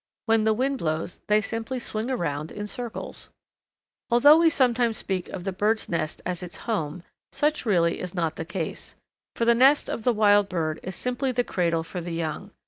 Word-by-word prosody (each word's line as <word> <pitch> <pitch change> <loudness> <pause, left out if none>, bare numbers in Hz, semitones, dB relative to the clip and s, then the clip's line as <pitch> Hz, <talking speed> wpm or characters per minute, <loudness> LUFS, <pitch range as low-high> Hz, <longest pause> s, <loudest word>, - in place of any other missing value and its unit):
When 225 -1 +3
the 220 - +4
wind 265 +3 0
blows 160 +1 -2
they 210 0 +4
simply 225 +4 -4
swing 225 -1 -3
around 155 - -2
in 210 - -5
circles. 235 +2 -6 0.8
Although 290 +7 +7
we 335 -1 +6
sometimes 245 -5 +2
speak 185 -2 -3
of 180 - -6
the 195 - -2
bird's 210 +4 0
nest 170 -3 -2
as 180 0 -3
its 180 -1 -7
home, 170 -7 -2 0.3
such 300 -3 0
really 170 -5 +2
is 180 0 -6
not 165 -3 -1
the 160 - -4
case, 175 0 -5 0.4
for 230 - 0
the 235 - +6
nest 270 +5 +5
of - - -3
the 245 - +3
wild 205 -2 +4
bird 160 -3 -2
is 185 0 -6
simply 250 +4 -1
the 245 0 +1
cradle 170 -6 0
for 175 +2 -6
the 170 0 -5
young. 165 +4 -3
210 Hz, 195 wpm, -25 LUFS, 170-240 Hz, 0.8 s, Although